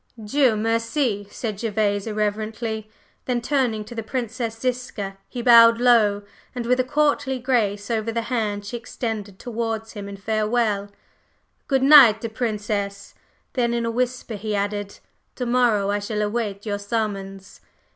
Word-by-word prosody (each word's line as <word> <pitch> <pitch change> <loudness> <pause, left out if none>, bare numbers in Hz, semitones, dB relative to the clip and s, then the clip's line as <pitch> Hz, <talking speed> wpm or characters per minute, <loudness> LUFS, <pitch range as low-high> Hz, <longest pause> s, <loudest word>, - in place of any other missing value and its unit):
"Dieu 255 +1 +3
merci!" 225 0 0
said 215 -2 -5
Gervase, 210 -2 0
irreverently; 215 +1 -2 0.4
then 245 -1 0
turning 240 -4 0
to 240 - -10
the 230 - -4
Princess 230 0 -4
Ziska, 230 -5 -3
he 245 -2 -5
bowed 230 -1 +8
low 220 -5 +4 0.3
and 245 -1 -3
with 250 +2 +2
a - - +4
courtly 285 -1 +1
grace 225 -5 0
over 225 0 -1
the 230 0 -2
hand 210 -4 -2
she 205 - -5
extended 220 -4 -5
towards 225 -1 -4
him 200 -2 -7
in 200 - -8
farewell. 215 0 0 0.8
"Good 270 -2 +2
night, 255 -6 +8
Princess!" 205 -3 -3 0.4
then 235 -2 +1
in 235 0 -1
a 230 - -1
whisper 250 0 -2
he 210 0 -3
added: 205 0 -3 0.4
"To 250 - -3
morrow 235 -5 +2
I 205 - 0
shall 210 +1 -2
await 210 -2 -3
your 205 -1 -2
summons." 200 -2 -4
225 Hz, 145 wpm, -23 LUFS, 205-240 Hz, 0.8 s, bowed